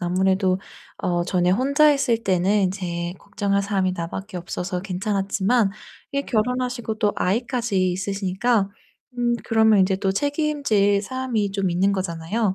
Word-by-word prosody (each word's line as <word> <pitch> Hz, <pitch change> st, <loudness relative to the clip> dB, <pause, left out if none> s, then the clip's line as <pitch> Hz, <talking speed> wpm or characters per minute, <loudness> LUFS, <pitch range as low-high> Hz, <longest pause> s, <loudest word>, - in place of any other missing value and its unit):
아무래도 185 Hz, +1 st, +1 dB, 0.4 s
어 175 Hz, -3 st, 0 dB
전에 180 Hz, 0 st, +1 dB
혼자 280 Hz, +9 st, +4 dB
있을 250 Hz, -5 st, +1 dB
때는 195 Hz, +1 st, +2 dB
인제 175 Hz, -2 st, -3 dB
걱정할 200 Hz, -1 st, -1 dB
사람이 195 Hz, -2 st, 0 dB
나밖에 185 Hz, +3 st, -5 dB
없어서 180 Hz, +1 st, -4 dB
괜찮았지만 195 Hz, +3 st, 0 dB, 0.4 s
이 280 Hz, -, 0 dB
결혼하시고 245 Hz, -1 st, -1 dB
또 210 Hz, -3 st, +2 dB
아이까지 220 Hz, -2 st, 0 dB
있으시니까 195 Hz, +3 st, 0 dB, 0.5 s
음 240 Hz, -1 st, +1 dB
그러면 220 Hz, -2 st, +4 dB
인제 190 Hz, 0 st, +2 dB
또 195 Hz, 0 st, 0 dB
책임질 285 Hz, -7 st, +1 dB
사람이 230 Hz, -3 st, -2 dB
좀 195 Hz, -2 st, 0 dB
있는 190 Hz, +3 st, +2 dB
거잖아요. 190 Hz, +3 st, -1 dB
200 Hz, 325 characters per minute, -23 LUFS, 185-230 Hz, 0.5 s, 혼자